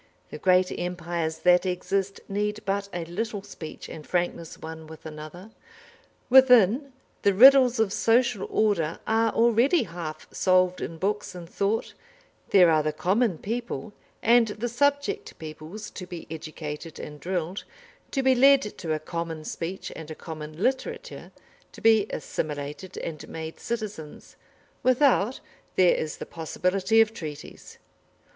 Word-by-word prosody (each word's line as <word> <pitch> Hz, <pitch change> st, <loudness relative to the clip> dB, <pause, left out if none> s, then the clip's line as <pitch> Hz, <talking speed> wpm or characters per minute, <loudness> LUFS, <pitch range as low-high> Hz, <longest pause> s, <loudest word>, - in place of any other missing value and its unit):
The 150 Hz, -, -7 dB
great 185 Hz, +2 st, +3 dB
empires 170 Hz, -2 st, -3 dB
that 180 Hz, 0 st, +6 dB
exist 195 Hz, +1 st, -2 dB
need 210 Hz, +1 st, -2 dB
but 200 Hz, 0 st, -1 dB
a 175 Hz, -2 st, -4 dB
little 205 Hz, +4 st, -4 dB
speech 180 Hz, -6 st, -9 dB
and 155 Hz, -, -9 dB
frankness 175 Hz, -1 st, -2 dB
one 160 Hz, 0 st, -9 dB
with 160 Hz, 0 st, -12 dB
another. 160 Hz, +6 st, -9 dB, 0.8 s
Within, 255 Hz, 0 st, +6 dB, 0.3 s
the 200 Hz, -1 st, +3 dB
riddles 255 Hz, +1 st, +8 dB
of 210 Hz, -3 st, +2 dB
social 230 Hz, -3 st, +2 dB
order 170 Hz, -7 st, +1 dB
are 225 Hz, 0 st, +2 dB
already 235 Hz, -, +3 dB
half 165 Hz, -5 st, -7 dB
solved 185 Hz, -1 st, +2 dB
in 165 Hz, -, -5 dB
books 205 Hz, +2 st, -2 dB
and 175 Hz, -2 st, -8 dB
thought, 200 Hz, +5 st, -1 dB, 0.6 s
there 180 Hz, -4 st, +6 dB
are 155 Hz, -1 st, +4 dB
the 155 Hz, 0 st, -1 dB
common 190 Hz, +5 st, +1 dB
people 230 Hz, +1 st, -4 dB, 0.3 s
and 235 Hz, 0 st, +5 dB
the 215 Hz, +3 st, -3 dB
subject 285 Hz, -, 0 dB
peoples 160 Hz, +6 st, -8 dB
to 185 Hz, -, -8 dB
be 175 Hz, -2 st, -8 dB
educated 155 Hz, 0 st, -7 dB
and 150 Hz, 0 st, -8 dB
drilled, 180 Hz, +1 st, -3 dB, 0.5 s
to 270 Hz, -, -1 dB
be 265 Hz, 0 st, +5 dB
led 275 Hz, +2 st, +6 dB, 0.2 s
to 165 Hz, -4 st, -2 dB
a 155 Hz, -, -1 dB
common 165 Hz, 0 st, -5 dB
speech 180 Hz, +3 st, -5 dB
and 160 Hz, -1 st, -9 dB
a 155 Hz, -, -6 dB
common 155 Hz, +2 st, -7 dB
literature, 465 Hz, -, -3 dB, 0.4 s
to -, -, -11 dB
be 220 Hz, -2 st, +4 dB
assimilated 150 Hz, +4 st, -5 dB
and 160 Hz, -2 st, -6 dB
made 160 Hz, 0 st, -7 dB
citizens; 210 Hz, -10 st, -6 dB, 0.5 s
without, 255 Hz, -2 st, +3 dB, 0.3 s
there 180 Hz, -2 st, +5 dB
is 155 Hz, -1 st, -3 dB
the -, -, -6 dB
possibility 185 Hz, +6 st, +1 dB
of 220 Hz, 0 st, +2 dB
treaties. 150 Hz, -7 st, -9 dB
185 Hz, 140 wpm, -26 LUFS, 160-225 Hz, 0.8 s, riddles